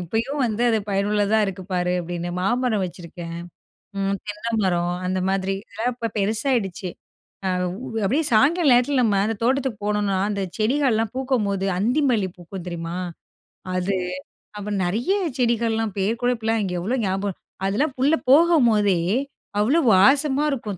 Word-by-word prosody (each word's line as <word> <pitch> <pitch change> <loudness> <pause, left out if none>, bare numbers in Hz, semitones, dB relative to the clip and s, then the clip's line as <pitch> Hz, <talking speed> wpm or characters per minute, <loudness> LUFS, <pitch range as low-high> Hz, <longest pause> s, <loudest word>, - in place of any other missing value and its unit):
இப்பயும் 225 - -2
வந்து, 225 +1 -2
அது 220 - +2
பயனுள்ளதா 205 +2 +2
இருக்கு 190 -1 -5
பாரு!" 180 0 +1
அப்பிடின்னு 175 0 -4
மாமரம் 220 +1 +1
வச்சிருக்கேன், 170 -1 -8 0.6
ம் 195 0 0
தென்னை 210 +3 -4
மரம் 175 -1 +1
அந்த 185 0 0
மாதிரி. 195 0 0
இதெல்லாம் 245 +3 -2
இப்ப 230 -3 -4
பெருசாயிடுச்சு. 210 -3 0 0.6
அ - - +1 0.4
உ - - -6 0.2
அப்பிடியே 290 +10 +1
சாய்ங்காலம் 290 +5 +4
நேரத்தில 255 +2 +3
நம்ம 205 -3 +2
அந்த 225 +1 -1
தோட்டத்துக்கு 260 -3 0
போனோம்னா, 205 -2 0
அந்த 200 -1 -2 0.2
செடிகள்லாம் 225 -2 +1
பூக்கும்போது 215 -8 0
அந்தி 250 +9 +2
மல்லி 200 -5 +1
பூக்கும் 175 +1 -9
தெரியுமா? 170 +1 -5 0.8
அது. 185 +1 0 0.6
அப்புறம் 205 -1 -3
நிறைய 225 - -1 0.3
செடிகள்லாம் 225 -3 0
பேரு 195 +3 +1
கூட 245 0 +2
இப்பெல்லாம் 225 0 0
இங்க 185 -2 -3
எவ்ளோ 235 +8 -1
ஞாப 195 +1 -1 0.3
அதெல்லாம் 260 +9 0
உள்ள 285 +5 +3
போகும்போதே! 240 - +5 0.6
அவ்ளோ 270 +11 +3
வாசமா 275 +8 +4
இருக்கும், 215 -8 -4
210 Hz, 140 wpm, -23 LUFS, 190-250 Hz, 0.8 s, போகும்போதே